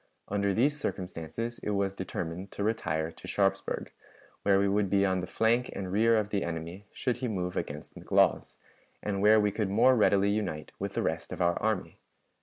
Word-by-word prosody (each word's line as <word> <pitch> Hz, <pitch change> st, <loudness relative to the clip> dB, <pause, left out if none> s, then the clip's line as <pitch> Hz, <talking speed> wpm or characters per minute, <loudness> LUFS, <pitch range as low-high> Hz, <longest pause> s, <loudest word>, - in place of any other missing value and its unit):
Under 100 Hz, 0 st, +1 dB
these 140 Hz, +9 st, +2 dB
circumstances 95 Hz, -, -4 dB
it -, -, -3 dB
was 100 Hz, -1 st, 0 dB
determined 90 Hz, -1 st, -5 dB
to 100 Hz, -, -3 dB
retire 80 Hz, -7 st, -1 dB
to -, -, -12 dB
Sharpsburg, 95 Hz, -1 st, 0 dB, 0.5 s
where 100 Hz, -1 st, +4 dB
we 100 Hz, +1 st, +3 dB
would 100 Hz, 0 st, +1 dB
be 100 Hz, 0 st, +3 dB
on 95 Hz, -1 st, +1 dB
the 90 Hz, -, -4 dB
flank 120 Hz, +3 st, +1 dB
and 95 Hz, -2 st, -5 dB
rear 115 Hz, +3 st, +4 dB
of 105 Hz, -1 st, 0 dB
the 100 Hz, -2 st, 0 dB
enemy 85 Hz, +4 st, -5 dB
should 125 Hz, -2 st, -1 dB
he 130 Hz, -, -2 dB
move 90 Hz, -5 st, -2 dB
against 75 Hz, +1 st, -5 dB
McLaws, -, -, +1 dB, 0.5 s
and 100 Hz, -2 st, -1 dB
where 110 Hz, +1 st, +6 dB
we 105 Hz, -1 st, +2 dB
could 105 Hz, -1 st, -1 dB
more 115 Hz, +6 st, +5 dB
readily 100 Hz, -3 st, +4 dB
unite 95 Hz, -8 st, -2 dB
with -, -, -4 dB
the -, -, 0 dB
rest -, -, -2 dB
of -, -, -5 dB
our 85 Hz, 0 st, +2 dB
army. 110 Hz, -3 st, -1 dB
100 Hz, 195 wpm, -29 LUFS, 90-110 Hz, 0.5 s, where